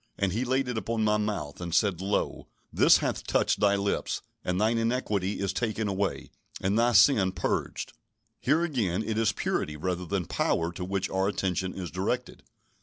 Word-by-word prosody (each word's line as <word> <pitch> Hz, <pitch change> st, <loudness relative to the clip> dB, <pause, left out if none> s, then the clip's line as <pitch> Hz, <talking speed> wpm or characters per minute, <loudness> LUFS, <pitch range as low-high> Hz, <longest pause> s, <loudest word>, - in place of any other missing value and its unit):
And 100 Hz, -2 st, 0 dB
he 115 Hz, +5 st, 0 dB
laid 130 Hz, +1 st, 0 dB
it 125 Hz, -3 st, -1 dB
upon 115 Hz, 0 st, -2 dB
my 105 Hz, 0 st, +3 dB
mouth, 100 Hz, -9 st, -3 dB
and 85 Hz, -1 st, -2 dB
said, 95 Hz, -5 st, +2 dB
Lo, 100 Hz, +1 st, -1 dB, 0.3 s
this -, -, +6 dB
hath -, -, -2 dB
touched -, -, +1 dB
thy 100 Hz, -1 st, +4 dB
lips; 100 Hz, 0 st, -1 dB, 0.2 s
and 90 Hz, 0 st, -1 dB
thine 110 Hz, +2 st, +2 dB
iniquity 105 Hz, -5 st, -1 dB
is 100 Hz, -1 st, -1 dB
taken 110 Hz, 0 st, -1 dB
away, 100 Hz, 0 st, -2 dB, 0.3 s
and 100 Hz, +4 st, +1 dB
thy 120 Hz, +1 st, +3 dB
sin 100 Hz, -3 st, +5 dB
purged." -, -, -2 dB, 0.5 s
Here 155 Hz, +6 st, +2 dB
again, 110 Hz, -, 0 dB
it 110 Hz, 0 st, -1 dB
is 110 Hz, -2 st, +3 dB
purity 75 Hz, -6 st, -2 dB
rather 90 Hz, +2 st, -3 dB
than 95 Hz, 0 st, -1 dB
power 85 Hz, +2 st, 0 dB
to 90 Hz, -, -6 dB
which 95 Hz, 0 st, -1 dB
our 95 Hz, +1 st, +1 dB
attention 95 Hz, -2 st, -1 dB
is 90 Hz, -3 st, -5 dB
directed. 110 Hz, +8 st, -2 dB
100 Hz, 180 wpm, -28 LUFS, 95-115 Hz, 0.5 s, this